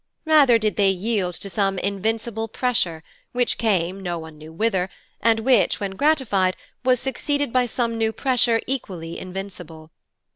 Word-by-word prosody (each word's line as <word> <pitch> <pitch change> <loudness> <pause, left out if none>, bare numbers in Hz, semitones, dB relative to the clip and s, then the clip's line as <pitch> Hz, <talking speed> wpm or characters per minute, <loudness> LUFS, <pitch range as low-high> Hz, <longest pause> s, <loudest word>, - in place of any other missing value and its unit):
Rather 295 -7 +6
did 215 -2 -1
they 200 -2 +4
yield 190 -2 -1
to 200 - -7
some 195 0 0
invincible 220 +3 -2
pressure, 205 -10 0 0.3
which 245 -1 0
came 190 -4 0
no 175 -2 -3
one 160 -1 -9
knew 155 +1 -12
whither, 190 0 0 0.3
and 225 -1 +3
which, 245 -2 +3
when 200 -2 -3
gratified, 205 -7 +2 0.3
was 255 -1 +3
succeeded 285 0 -1
by 250 -1 +3
some 230 -1 -1
new 220 0 +2
pressure 240 -1 +2
equally 185 -11 -4
invincible. 180 -4 -8
215 Hz, 150 wpm, -23 LUFS, 185-240 Hz, 0.3 s, Rather